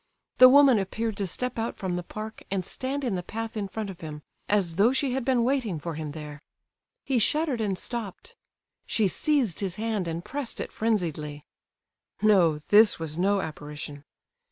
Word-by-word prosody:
The 255 0 +11
woman 270 -4 +7
appeared 220 +3 -2
to 200 - -1
step 250 +6 -3
out 225 +1 -3
from 185 -2 -2
the 180 - -2
park, 215 +5 -8
and 190 -2 -2
stand 270 +6 -4
in 240 -5 0
the 180 - -1
path 225 +5 -6
in 205 -2 -2
front 210 0 -5
of 185 -1 -13
him, 150 -2 -7 0.3
as 190 -5 +2
though 215 +5 +5
she 265 0 0
had 265 0 -1
been 250 -2 +2
waiting 240 - 0
for 170 +2 -5
him 155 -1 -5
there. 150 -1 -8 0.6
He 265 -3 +1
shuddered 285 +1 +2
and 200 -3 -1
stopped; 220 -3 -5 0.5
she 215 -3 +2
seized 255 - +1
his 190 -3 -2
hand 215 -4 -2
and 165 +1 -4
pressed 280 -4 -4
it - - -4
frenziedly. 160 -9 -2 0.7
No, 190 -7 +4
this 210 +1 +6
was 160 -2 -5
no 195 +3 +2
apparition! 150 -2 -7
205 Hz, 180 wpm, -27 LUFS, 170-235 Hz, 0.7 s, The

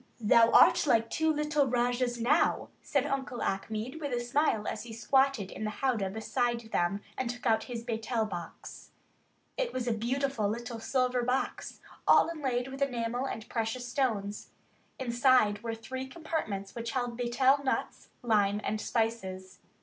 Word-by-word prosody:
"Thou 230 +1 +5
art 295 - +6
like 230 -3 +3
two 320 0 +2
little 300 -1 +1
Rajahs 245 0 0
now," 270 +8 +2
said 280 -1 0
Uncle 270 -3 -3
Achmed, 220 +9 -3
with 285 -2 -3
a 245 - 0
smile 240 -3 +1
as 215 - -3
he 230 0 -9
squatted 235 -2 +2
in - - -6
the 215 - -1
howdah 220 -4 -1
beside 235 +3 -1
them 175 +4 0 0.2
and 260 -2 -1
took 245 +1 -6
out 220 -2 +2
his 235 -2 -6
"betel" 225 -1 -1
box. 175 -5 -8 0.7
It - - -1
was 250 -1 -3
a 235 - +2
beautiful 240 -1 -1
little 235 +1 -4
silver 250 +1 +1
box, 250 +2 -2 0.3
all - - +6
inlaid 265 -6 -2
with 270 +1 -8
enamel 245 -1 -1
and 220 -4 -6
precious 230 +2 -2
stones. 215 -6 -2 0.5
Inside 240 -4 +3
were 230 -1 -3
three 260 +4 -6
compartments 265 - -4
which 230 -1 -5
held 245 -2 -2
betel 255 +4 +2
nuts, 265 - -2
lime, 210 -3 +2
and 215 0 -2
spices. 190 -5 -2
240 Hz, 155 wpm, -30 LUFS, 220-260 Hz, 0.7 s, art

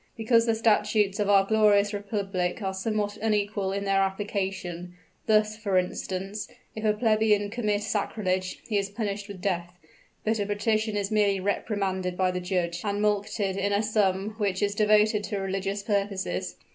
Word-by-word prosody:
Because 230 +1 +3
the 225 - +3
statutes 210 -2 +2
of 205 -1 +1
our 195 -1 +5
glorious 210 -1 +4
Republic 200 -3 -2
are 190 0 -1
somewhat 205 +1 -2
unequal 205 -3 0
in 200 +1 -2
their 195 0 +3
application; 190 -3 -3 0.3
thus, 215 -1 +3
for 205 -3 0
instance, 190 +3 -2 0.3
if 220 - -5
a 215 - +4
plebeian 215 -2 +2
commit 210 -3 0
sacrilege, 190 -3 -2
he 210 -3 +1
is 200 0 -3
punished 205 -1 -3
with 200 -3 -9
death; 175 -3 -1 0.5
but 220 0 0
a 205 - 0
patrician 215 +1 0
is 200 +1 -2
merely 205 -2 +2
reprimanded 190 -2 -1
by 185 -1 +2
the 180 0 -3
judge 175 -2 -1
and 205 -1 -1
mulcted 205 -1 0
in 200 +1 0
a 200 +2 +2
sum 205 -2 +1
which 200 -2 0
is 200 0 +1
devoted 210 0 +3
to 205 - -3
religious 195 +1 -2
purposes. 200 -2 -2
205 Hz, 165 wpm, -27 LUFS, 195-215 Hz, 0.5 s, our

